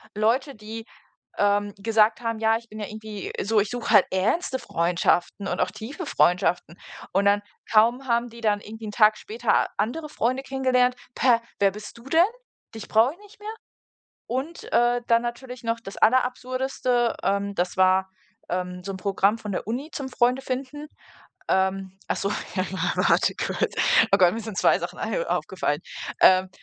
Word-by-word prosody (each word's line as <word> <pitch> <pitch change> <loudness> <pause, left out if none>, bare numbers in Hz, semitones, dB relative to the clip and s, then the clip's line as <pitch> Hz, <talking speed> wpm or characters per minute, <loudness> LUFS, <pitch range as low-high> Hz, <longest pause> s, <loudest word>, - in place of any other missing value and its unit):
Leute, 245 +6 +1
die 220 +1 -8 0.5
ähm, 205 0 +1
gesagt 220 +2 +2
haben: 230 -2 -2
„Ja, 220 0 +3
ich 230 0 -15
bin 215 - -9
ja 210 - -4
irgendwie 215 -2 -7
so 220 +2 +2
ich 205 0 0
suche 245 -1 -4
halt 205 -4 +7
ernste 245 - 0
Freundschaften, 175 +2 0
und - - -2
auch - - +1
tiefe 285 +11 -7
Freundschaften.“ 175 - +1 0.3
Und 195 +2 +1
dann, 205 0 +4 0.3
kaum 235 +5 +3
haben 235 0 +1
die 235 +1 -13
dann 210 -2 +1
irgendwie 220 +1 -9
'n - - -5
Tag 215 -1 +5
später 225 +2 0
andere 305 +8 -2
Freunde 255 -1 -1
kennengelernt. 255 -2 +1 0.2
„Pä, 240 -2 +3 0.2
wer 200 -1 +4
bist 210 +3 -10
du 235 - -14
denn? 320 +5 +4 0.5
Dich 220 - -8
brauch 225 +4 +4
ich 330 - -15
nicht 415 +1 -18
mehr?“ 425 +1 -6 0.7
Und, 270 +7 -4
äh, 240 +1 +3
dann 230 0 +4
natürlich 240 +1 -6
noch 230 0 -1
das 195 - -9
aller 255 +3 +5
Absurdeste, 255 -1 -1
ähm, 200 0 0
das 180 0 -1
war, 190 0 +3 0.4
ähm, 180 0 -3
so 195 - -4
'n - - -6
Programm 200 +2 +1
von 210 -2 -6
der 190 - -4
Uni 255 +7 -3
zum 275 -3 -5
Freunde 250 +1 +2
finden. 270 +3 -5 0.6
Ähm. 190 0 0
Ach - - 0
so, 195 - -1 0.3
ja, 185 - 0 0.3
warte - - +3
kurz. - - -2 0.4
Oh - - +7
Gott, 180 -2 +5
mir 230 - -4
sind 220 -3 -7
2 - - +4
Sachen - - -6
ein - - -2
aufgefallen. - - -1 0.4
Ähm. 185 0 +6
225 Hz, 180 wpm, -25 LUFS, 200-250 Hz, 0.7 s, halt